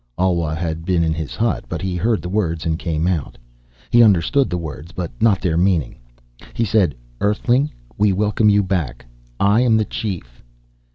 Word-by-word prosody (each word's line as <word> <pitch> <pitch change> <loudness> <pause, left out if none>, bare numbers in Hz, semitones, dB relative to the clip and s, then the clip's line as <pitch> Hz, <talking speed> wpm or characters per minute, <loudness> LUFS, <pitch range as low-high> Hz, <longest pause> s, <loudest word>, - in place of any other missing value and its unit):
Alwa 85 -4 +1
had 80 -1 -3
been 85 -1 +1
in 80 -1 +1
his 80 -2 -5
hut, 115 0 -1
but 85 - -3
he 95 +1 -3
heard 110 +5 0
the - - -4
words 90 -5 -1
and 80 0 -1
came 80 -2 -1
out. 85 -9 -2 0.5
He 120 0 +6
understood 110 +6 +4
the 90 - -1
words, 80 0 -7
but 85 -2 -5
not 110 -4 +3
their 85 -3 0
meaning. 85 -5 +1 0.6
He 115 - +1
said, 100 -7 +2 0.2
"Earthling, 120 +7 +1 0.3
we 105 -1 +4
welcome 105 +2 +2
you 100 0 +4
back. 80 -12 -2 0.3
I 100 +4 +4
am 115 -3 +4
the 110 - +1
chief." 90 - -5
90 Hz, 180 wpm, -20 LUFS, 80-105 Hz, 0.6 s, He